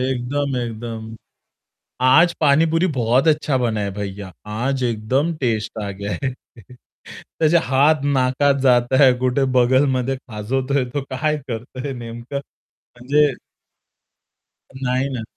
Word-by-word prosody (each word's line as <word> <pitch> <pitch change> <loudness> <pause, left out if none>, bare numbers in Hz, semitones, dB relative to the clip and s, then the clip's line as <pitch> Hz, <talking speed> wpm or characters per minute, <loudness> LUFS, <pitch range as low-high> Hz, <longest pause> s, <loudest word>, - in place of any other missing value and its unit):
एकदम, 130 +2 -1
एकदम. 115 -1 -5 0.9
"आज 165 +7 +5
पाणीपुरी 160 +4 +3
बहुत 125 +5 +2
अच्छा 150 -3 +2
बनाया 110 -5 -1
भैय्या, 100 -1 -6
आज 125 +5 -2
एकदम 125 +8 0
टेस्ट 110 -3 -1
आ 100 - -4
गया 100 +1 -6
है." 130 - -1 0.8
त्याचे 160 +1 0
हात 140 +3 +3
नाकात 140 0 +2
जाताय, 130 +1 +4
कुठे 130 +2 +1
बगलमध्ये 130 +1 +2
खाजवतोय 130 +4 -2
तो, 135 +3 -4
काय 150 +3 -1
करतोय 125 +3 -5
नेमकं 120 +2 -8 0.4
म्हणजे 140 +5 0 1.6
नाही 130 +1 0
ना. 115 - -4
130 Hz, 110 wpm, -20 LUFS, 115-140 Hz, 1.6 s, आज